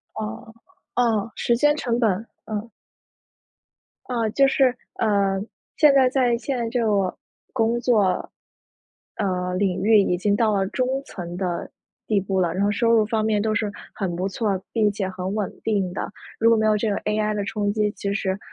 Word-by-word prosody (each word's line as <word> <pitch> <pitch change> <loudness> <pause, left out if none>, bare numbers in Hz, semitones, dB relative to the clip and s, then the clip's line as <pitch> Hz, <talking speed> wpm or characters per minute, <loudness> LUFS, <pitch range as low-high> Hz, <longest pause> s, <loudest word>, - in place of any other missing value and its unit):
哦， 110 - -6 0.4
哦， 230 -3 +1
时 235 - +1
间 295 +4 +3
成 240 -5 -1
本， 230 -3 +3 0.4
嗯。 215 +1 -4 1.4
啊， 235 -3 -1
就 275 +5 +4
是， 265 -2 +3 0.2
呃， 200 -2 +2 0.4
现 300 -3 +6
在 265 -2 +5
在 250 -3 +2
现 260 +2 -3
在 235 -1 -1
这 240 0 0
个 200 -4 +1 0.4
工 230 -1 +1
作 210 -7 +2 0.9
呃， 180 -2 -1
领 185 -1 0
域 215 +1 +5
已 180 -3 +2
经 200 +2 +1
到 220 -1 +2
了 195 -1 +1
中 255 +6 -1 0.2
层 175 -2 -7
的 180 -3 -3 0.4
地 210 -2 +2
步 190 0 -2
了。 175 -3 +1
然 185 +3 -1
后 205 - +3
收 230 +3 +2
入 225 -2 +5
方 220 0 0
面 215 -1 +2
都 215 +1 0
是 210 -1 -1 0.2
很 190 -4 -2
不 185 +3 -1
错， 195 -1 -1
并 215 -3 +2
且 195 -2 -2
很 185 +1 -4
稳 210 -3 -1
定 200 -5 0
的。 - - -4 0.3
如 230 +1 +4
果 230 - +5
没 220 0 +2
有 215 0 +4
这 215 +1 0
个 200 - 0
AI 210 0 -1
的 205 -1 -2
冲 205 -1 -1
击， 210 -1 +1
其 200 -1 -3
实 195 -2 -1
210 Hz, 205 characters per minute, -23 LUFS, 195-230 Hz, 1.4 s, 现